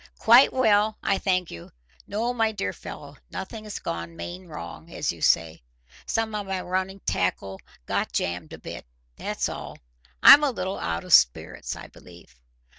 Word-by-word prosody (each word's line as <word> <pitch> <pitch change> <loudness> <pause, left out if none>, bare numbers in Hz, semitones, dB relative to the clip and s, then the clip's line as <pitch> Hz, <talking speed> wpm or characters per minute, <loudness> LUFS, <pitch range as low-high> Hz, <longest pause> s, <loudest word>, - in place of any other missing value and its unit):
"Quite 240 +4 +7
well, 215 -4 +3
I 195 - +1
thank 185 -3 0
you. 85 - -10 0.4
No, 230 +4 -1
my 225 -2 +1
dear 210 -2 -3
fellow, 145 -1 -10
nothing's 210 +2 -6
gone 85 0 -5
main 180 - -8
wrong, 160 +1 -9
as 150 - -1
you 85 - -12
say. 80 -2 +2 0.5
Some 225 -1 -1
of 205 -2 -4
my 190 -1 -2
running 185 +2 -3
tackle 95 +1 -2 0.2
got - - -1
jammed 85 -2 -3
a - - -8
bit, - - -9 0.3
that's - - -2
all. - - -7 0.5
I'm 295 - +10
a 295 - +3
little 190 -6 -4
out 85 0 -3
of - - -2
spirits, - - +3
I - - -9
believe." 85 -9 -16
185 Hz, 165 wpm, -25 LUFS, -, 0.5 s, I'm